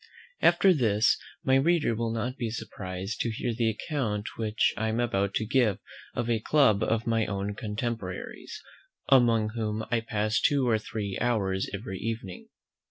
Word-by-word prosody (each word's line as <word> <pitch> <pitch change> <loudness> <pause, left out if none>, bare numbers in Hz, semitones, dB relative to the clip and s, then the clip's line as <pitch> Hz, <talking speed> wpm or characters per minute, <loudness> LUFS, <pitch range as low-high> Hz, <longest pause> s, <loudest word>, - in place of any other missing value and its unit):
After 190 -2 +5
this, 110 -7 +3 0.3
my 130 0 +4
reader 155 -2 +2
will 115 0 -1
not 120 +3 -2
be 120 -4 -3
surprised 95 -3 -5
to 120 - 0
hear 115 +2 -2
the 115 0 +1
account 110 -3 -2
which 110 -1 +1
I 110 - -1
am 110 +2 -1
about 100 -4 0
to 110 - 0
give 110 -4 +2 0.4
of 120 - -1
a 115 -2 +1
club 110 -4 +3
of 115 0 0
my 115 -1 +1
own 100 0 -2
contemporaries, 105 -3 -5 0.5
among 115 -5 +5
whom 110 -1 -3
I 120 - +3
pass 110 -1 -1
two 140 -3 +2
or 110 -2 +3
three 105 -3 -4
hours 100 -6 0
every 95 -2 -5
evening. 110 -5 -5
110 Hz, 165 wpm, -28 LUFS, 105-120 Hz, 0.5 s, After